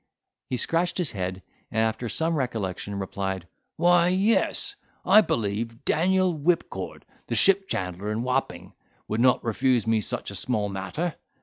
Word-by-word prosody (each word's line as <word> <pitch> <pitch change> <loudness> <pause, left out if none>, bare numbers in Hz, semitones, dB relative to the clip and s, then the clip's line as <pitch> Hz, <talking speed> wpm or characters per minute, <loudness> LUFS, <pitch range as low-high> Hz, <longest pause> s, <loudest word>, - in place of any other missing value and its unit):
He 125 - -1
scratched 165 +8 0
his 175 -6 0
head, 95 -1 -4 0.3
and - - -6
after 110 +1 0
some 165 +6 0
recollection, 100 - -3
replied, 95 -2 -3 0.3
"Why, 175 +1 +5
yes, 195 +5 +2 0.3
I 215 - +8
believe 115 - -2
Daniel 185 +2 +2
Whipcord, 165 +3 -1 0.2
the - - -2
ship 195 0 +4
chandler 95 +3 -3
in 110 +2 -2
Wapping, 125 -9 -2 0.3
would 110 +2 -1
not 125 0 +4
refuse 125 +1 +1
me 115 -1 +2
such 100 - -3
a - - -8
small 105 0 0
matter. 100 - -3
115 Hz, 145 wpm, -26 LUFS, 100-165 Hz, 0.3 s, I